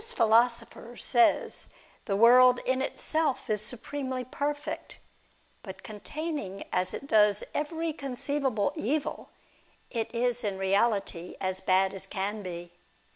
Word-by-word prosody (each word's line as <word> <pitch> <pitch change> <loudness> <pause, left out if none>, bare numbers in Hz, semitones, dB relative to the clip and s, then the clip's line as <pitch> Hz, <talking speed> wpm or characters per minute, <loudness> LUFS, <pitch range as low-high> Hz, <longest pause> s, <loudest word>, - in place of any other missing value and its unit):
philosopher 235 - +1
says 240 -2 +2 0.4
the 195 - -1
world 245 +3 +7
in 260 0 +1
itself 310 -3 -1
is 210 -1 0
supremely 255 +3 -4
perfect, 290 +4 -4 0.6
but - - -10
containing 220 - -5
as 180 0 0
it - - -6
does 210 -5 +3
every 320 +2 -2
conceivable 270 -5 -1
evil, 285 +7 -2 0.6
it 230 -3 -1
is 245 0 +1
in 200 -3 -2
reality 195 -2 0
as 185 0 -2
bad 190 +1 +3
as 195 - -3
can 205 +2 -2
be. 175 -2 -7
235 Hz, 120 wpm, -28 LUFS, 200-270 Hz, 0.6 s, world